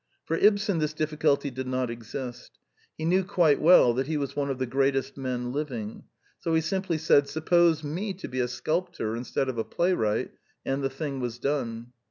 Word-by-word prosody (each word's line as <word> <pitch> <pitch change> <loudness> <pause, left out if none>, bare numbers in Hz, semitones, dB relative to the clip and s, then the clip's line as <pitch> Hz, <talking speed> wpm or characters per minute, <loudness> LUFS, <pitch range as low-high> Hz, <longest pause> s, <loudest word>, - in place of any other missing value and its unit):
For 165 - 0
Ibsen 200 -2 +3
this 155 0 -1
difficulty 150 -2 +1
did 130 +1 -5
not 130 -2 -1
exist. 120 +2 -7 0.4
He 155 - -3
knew 185 +3 +3
quite 170 -5 +3
well 155 -7 +7
that 130 +2 -1
he 155 -1 -1
was 140 -2 -3
one 140 -1 -1
of 135 - -2
the 130 - -1
greatest 135 +1 0
men 125 -2 -3
living; 125 -7 -4 0.3
so 165 - 0
he 160 - +3
simply 185 0 -1
said' 145 -2 +4
^^ - - -16
Suppose 160 +2 +3
me 185 +7 -3
to 185 - -7
be 130 - -4
a 125 - +1
sculptor 155 -3 -2
instead 125 +3 -2
of 125 -3 -3
a - - +1
playwright,'' 115 - 0 0.3
and 135 +1 -1
the 135 - +1
thing 135 0 -4
was 120 -2 -3
done. 120 -3 -3
140 Hz, 200 wpm, -27 LUFS, 125-160 Hz, 0.4 s, well